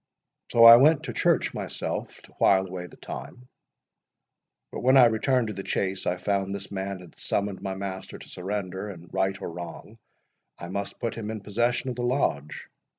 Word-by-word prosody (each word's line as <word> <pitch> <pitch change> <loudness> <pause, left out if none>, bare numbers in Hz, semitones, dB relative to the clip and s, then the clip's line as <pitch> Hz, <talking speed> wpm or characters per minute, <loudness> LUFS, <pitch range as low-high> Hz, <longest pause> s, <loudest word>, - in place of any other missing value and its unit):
'—So 115 - +5
I 115 0 +12
went 155 +4 +5
to 125 -5 -5
church - - +2
myself, - - -4
to - - -18
while 95 -1 +4
away 90 -1 -6
the - - -16
time; 125 0 -9 1.2
but - - -5
when 130 +2 +5
I 130 - +9
returned 115 +1 +2
to - - -4
the 100 - -5
Chase, 95 -1 -2
I 90 - 0
found 100 +1 -1
this 100 0 -8
man 95 -1 -4
had 90 - -15
summoned 100 -1 -2
my 95 0 -3
master 95 -1 -6
to - - -13
surrender, 95 +1 -4
and, 85 -3 -11
right 95 0 0
or - - -5
wrong, 85 +1 -9 0.6
I 85 - -8
must 100 +1 -4
put 115 - -2
him 110 -2 -6
in 110 -1 -5
possession 120 +5 0
of 120 - -7
the - - -2
Lodge. 120 - -1
100 Hz, 190 wpm, -26 LUFS, 95-120 Hz, 1.2 s, I